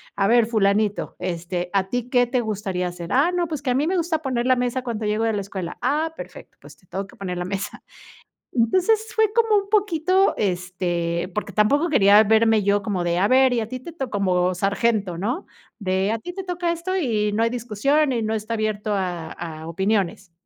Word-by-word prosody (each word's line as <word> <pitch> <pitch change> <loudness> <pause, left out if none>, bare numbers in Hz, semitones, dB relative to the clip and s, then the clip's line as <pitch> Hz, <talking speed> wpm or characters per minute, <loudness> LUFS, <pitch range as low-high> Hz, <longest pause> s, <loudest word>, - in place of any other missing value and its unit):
A 195 0 +2
ver, 235 0 +5
fulanito, 210 -2 +1
este, 175 0 -3
¿a 190 -1 +1
ti 245 -1 -2
qué 245 -1 +3
te 250 0 0
gustaría 200 -5 -2
hacer?". 175 -1 -7
"Ah, 285 +7 +3
no, 350 -1 0
pues, 305 -3 -4
que 260 -3 -1
a - - +2
mí 295 +4 +1
me 370 +1 +1
gusta 325 -2 0
poner 250 -4 -1
la 255 0 +4
mesa 250 +1 -1
cuando 225 -3 -3
llego 210 +2 0
de 225 - +1
la 205 - -1
escuela". 190 -3 -6
"Ah, 310 +5 0
perfecto, - - -11
pues, - - -14
te 180 - -27
toca 195 +2 -4
que - - -17
poner 180 -2 -4
la 180 - -3
mesa". 195 +1 -5 0.7
Entonces, 370 - +2
fue 440 -1 +2
como 450 -2 +3
un 395 - -15
poquito, 380 -2 +2
este, 180 -2 -2
porque 210 -1 -3
tampoco 285 - +3
quería 205 -6 +6
verme 220 0 +3
yo 200 +1 +2
como 190 -4 -2
de: 170 0 0
"A 195 - +3
ver, 260 0 +5
y 235 - +1
a 220 - -4
ti 255 -1 -6
te 335 +5 -9
toca", 265 -6 -5
como 185 -3 +1
sargento, 200 -1 0
¿no?, 245 - -2 0.3
de: 190 +2 0
"A 225 - -1
ti 355 - -7
te 385 0 -6
toca 350 -1 -2
esto, 355 +3 -3
y 215 - 0
no 220 +2 +1
hay 230 - +2
discusión, 250 +5 +1
y 230 -2 -1
no 220 +1 -1
está 220 +1 -3
abierto 215 -1 -2
a 175 -4 -3
a 160 -2 -7
opiniones". 190 0 -1
220 Hz, 220 wpm, -23 LUFS, 190-265 Hz, 0.7 s, quería